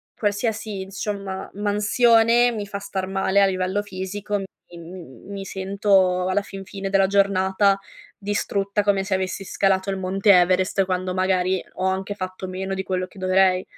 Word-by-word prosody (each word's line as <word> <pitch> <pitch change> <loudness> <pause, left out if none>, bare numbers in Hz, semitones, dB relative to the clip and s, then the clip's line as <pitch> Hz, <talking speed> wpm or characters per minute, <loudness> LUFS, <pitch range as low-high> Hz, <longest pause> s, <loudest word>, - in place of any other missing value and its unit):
qualsiasi, 210 -1 -2
insomma, 195 0 -5
mansione 225 +3 +3
mi 215 -3 -4
fa 200 0 -5
star 190 -2 -4
male 195 +1 +1
a - - +6
livello 185 +1 0
fisico. 205 +1 -4
Mi 195 - -5 0.3
m 170 -7 -11
mi 195 -1 -6
sento 190 -1 +1
alla 190 +2 +1
fin 195 -1 -9
fine 195 0 -5
della 195 0 +4
giornata 195 0 +2 0.4
distrutta, 200 0 -1
come 200 -1 +2
se 195 - -3
avessi 190 +1 -3
scalato 190 0 0
il 195 - -3
Monte 195 +2 +2
Everest 185 +1 +3
quando 185 0 -2
magari 185 0 +1
ho 185 - -2
anche 190 +2 -1
fatto 185 -1 -6
meno 190 +1 -4
di 190 - -2
quello 185 -1 -2
che 195 - -15
dovrei. 185 0 +3
195 Hz, 160 wpm, -23 LUFS, 185-200 Hz, 0.4 s, a